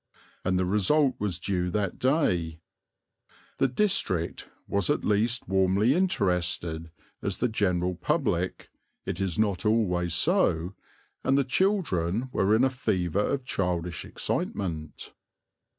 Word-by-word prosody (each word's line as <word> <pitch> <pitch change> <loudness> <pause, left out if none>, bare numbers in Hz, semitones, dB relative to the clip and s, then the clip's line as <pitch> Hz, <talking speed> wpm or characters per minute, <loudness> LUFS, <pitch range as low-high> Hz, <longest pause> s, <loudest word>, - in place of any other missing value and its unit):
And 95 0 +1
the 90 - +1
result 130 +9 +3
was 100 -5 -2
due 90 0 -1
that 100 -1 -2
day. 90 - +1 1.0
The - - +4
district 125 - 0 0.2
was 100 -3 0
at - - +1
least 110 +4 +1
warmly 95 +5 +3
interested 90 - 0 0.3
as 100 -3 -2
the 125 - +1
general 90 -5 0
public 85 - -1 0.4
it 90 - -3
is 95 -3 -1
not 105 -4 +1
always 90 -6 +1
so 90 - +2 0.5
and 135 - +3
the 140 - +3
children 130 - 0
were 100 -1 +2
in 115 - +3
a 135 - +4
fever 95 -7 0
of 135 +1 -1
childish 90 -6 -2
excitement. 80 -6 -4
95 Hz, 125 wpm, -27 LUFS, 90-125 Hz, 1.0 s, The